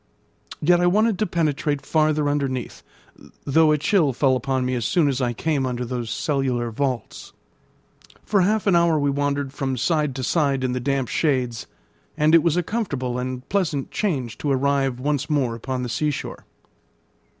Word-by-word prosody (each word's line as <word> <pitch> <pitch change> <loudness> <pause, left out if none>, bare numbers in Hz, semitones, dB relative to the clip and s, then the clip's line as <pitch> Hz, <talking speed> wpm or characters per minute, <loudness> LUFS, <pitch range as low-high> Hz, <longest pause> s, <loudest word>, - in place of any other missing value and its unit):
Yet 175 +3 +4
I 175 - +3
wanted 215 +2 +2
to 215 - +1
penetrate 150 -4 -1
farther 155 -1 +1
underneath, 140 -4 -2 0.6
though 155 +2 +4
a 150 - +3
chill 150 -2 +2
fell 130 +1 +2
upon 130 0 -1
me 130 - -1
as 120 -2 -1
soon 155 +6 +2
as 135 -1 -1
I 120 -1 +1
came 145 +3 -1
under 125 -1 -2
those 120 -2 -4
cellular 125 -3 -1
vaults. 125 -1 -4 0.9
For 205 -2 +2
half 210 +3 +1
an 195 -4 +4
hour 170 -2 +3
we 145 -1 +1
wandered 140 -1 -1
from 135 -2 -2
side 150 +1 0
to 130 - -4
side 140 -2 +1
in 130 - 0
the 125 - -2
damp 135 0 -1
shades, 125 -6 -1 0.5
and 155 +1 +3
it 165 - +7
was 170 0 +1
a 180 - +1
comfortable 140 - -3
and 125 0 -5
pleasant 165 -9 -1
change 130 - -2
to 145 - -2
arrive 135 -1 +1
once 145 +1 -1
more 135 -6 +1
upon 125 +2 -4
the - - -3
sea 150 +5 0
shore. 145 - -6
140 Hz, 180 wpm, -23 LUFS, 130-155 Hz, 0.9 s, it